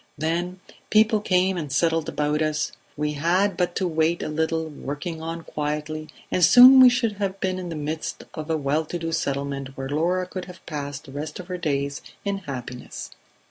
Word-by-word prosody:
Then 175 Hz, +4 st, -2 dB, 0.3 s
people 215 Hz, 0 st, +4 dB
came 185 Hz, -1 st, +2 dB
and 150 Hz, -5 st, -4 dB
settled 165 Hz, +2 st, +1 dB
about 150 Hz, +1 st, 0 dB
us; 155 Hz, -1 st, 0 dB, 0.3 s
we 150 Hz, 0 st, 0 dB
had 175 Hz, +6 st, +2 dB
but 175 Hz, 0 st, 0 dB
to 185 Hz, -, 0 dB
wait 160 Hz, +1 st, +1 dB
a -, -, -3 dB
little, 160 Hz, +1 st, 0 dB
working 155 Hz, +2 st, -5 dB
on 165 Hz, +1 st, -5 dB
quietly, 150 Hz, +1 st, -3 dB, 0.2 s
and 180 Hz, -, +2 dB
soon 255 Hz, +7 st, +10 dB
we 255 Hz, -1 st, +10 dB
should 235 Hz, -4 st, 0 dB
have 195 Hz, -1 st, -2 dB
been 185 Hz, -1 st, -1 dB
in 180 Hz, -1 st, -5 dB
the 165 Hz, -, -4 dB
midst 155 Hz, +1 st, -4 dB
of 155 Hz, 0 st, -6 dB
a 160 Hz, -, +2 dB
well 145 Hz, +2 st, 0 dB
to 175 Hz, -, -4 dB
do 165 Hz, -1 st, -3 dB
settlement 140 Hz, -2 st, -2 dB
where 135 Hz, 0 st, -4 dB
Laura 175 Hz, +5 st, +1 dB
could 185 Hz, 0 st, -6 dB
have 180 Hz, 0 st, -13 dB
passed 145 Hz, -3 st, -5 dB
the 135 Hz, -, -11 dB
rest 150 Hz, +3 st, -5 dB
of 180 Hz, 0 st, -9 dB
her 180 Hz, -, -3 dB
days 140 Hz, -3 st, -1 dB, 0.2 s
in 200 Hz, -1 st, -1 dB
happiness 125 Hz, -1 st, -6 dB
160 Hz, 195 wpm, -24 LUFS, 150-180 Hz, 0.3 s, soon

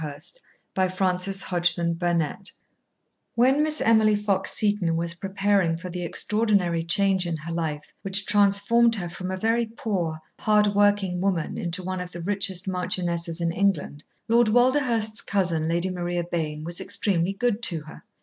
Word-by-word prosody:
PART 145 Hz, 0 st, -7 dB, 0.5 s
TWO 185 Hz, -1 st, +1 dB
Chapter 185 Hz, 0 st, +1 dB, 0.3 s
Seven 170 Hz, -2 st, +2 dB, 1.0 s
When 260 Hz, +5 st, +4 dB
Miss 305 Hz, 0 st, +2 dB
Emily 220 Hz, -2 st, +4 dB
Fox 200 Hz, -2 st, 0 dB
Seton 205 Hz, -6 st, +1 dB
was 170 Hz, 0 st, 0 dB
preparing 195 Hz, -2 st, 0 dB
for 180 Hz, +1 st, -8 dB
the 180 Hz, 0 st, -4 dB
extraordinary 200 Hz, -2 st, +1 dB
change 190 Hz, +2 st, +1 dB
in 165 Hz, -2 st, -2 dB
her 160 Hz, +2 st, -7 dB
life 155 Hz, -3 st, -4 dB
which 195 Hz, +1 st, +1 dB
transformed 205 Hz, +3 st, +3 dB
her 180 Hz, -5 st, -4 dB
from 185 Hz, +2 st, -6 dB
a 190 Hz, -, -3 dB
very 225 Hz, +3 st, +1 dB
poor, 190 Hz, -8 st, -3 dB, 0.2 s
hardworking 205 Hz, -3 st, +2 dB
woman 185 Hz, -5 st, -1 dB
into 175 Hz, +2 st, -2 dB
one 185 Hz, 0 st, -3 dB
of 180 Hz, 0 st, -8 dB
the 175 Hz, -, -7 dB
richest 190 Hz, -1 st, 0 dB
marchionesses 175 Hz, -2 st, -2 dB
in 170 Hz, 0 st, 0 dB
England, 190 Hz, -5 st, -1 dB, 0.2 s
Lord 235 Hz, 0 st, +4 dB
Walderhurst's 240 Hz, -2 st, +2 dB
cousin, 175 Hz, -5 st, 0 dB
Lady 175 Hz, +2 st, 0 dB
Maria 175 Hz, -1 st, -2 dB
Bayne, 155 Hz, -3 st, -3 dB
was 170 Hz, +2 st, -2 dB
extremely 185 Hz, -2 st, 0 dB
good 235 Hz, +1 st, -1 dB
to 170 Hz, -8 st, 0 dB
her. 155 Hz, +1 st, -12 dB
185 Hz, 150 wpm, -25 LUFS, 170-205 Hz, 1.0 s, When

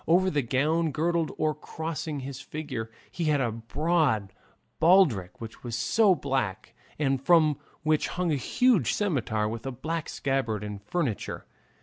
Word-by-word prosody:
Over 185 Hz, +3 st, +4 dB
the 145 Hz, -, +1 dB
gown, 150 Hz, +7 st, +1 dB
girdling 165 Hz, +2 st, 0 dB
or 155 Hz, -1 st, +1 dB
crossing 155 Hz, -1 st, -5 dB
his 135 Hz, 0 st, -6 dB
figure, 135 Hz, -6 st, -5 dB, 0.2 s
he 170 Hz, -, -3 dB
had 150 Hz, -2 st, +3 dB
a 120 Hz, -4 st, 0 dB
broad 115 Hz, -, 0 dB, 0.5 s
baldric 160 Hz, -, +4 dB
which 115 Hz, -1 st, -9 dB
was 120 Hz, -2 st, -4 dB
also 210 Hz, -, +3 dB
black, 115 Hz, -, -2 dB, 0.2 s
and 135 Hz, -3 st, 0 dB
from 155 Hz, -2 st, +4 dB, 0.2 s
which 155 Hz, -1 st, +2 dB
hung 180 Hz, -2 st, -1 dB
a -, -, +2 dB
huge 185 Hz, -, +2 dB
scimitar 125 Hz, -, 0 dB
with 115 Hz, +1 st, -5 dB
a -, -, -2 dB
black 160 Hz, +5 st, -4 dB
scabbard 125 Hz, -6 st, -1 dB
and 105 Hz, -1 st, -6 dB
furniture. 130 Hz, -, -2 dB
145 Hz, 150 wpm, -27 LUFS, 115-165 Hz, 0.5 s, Over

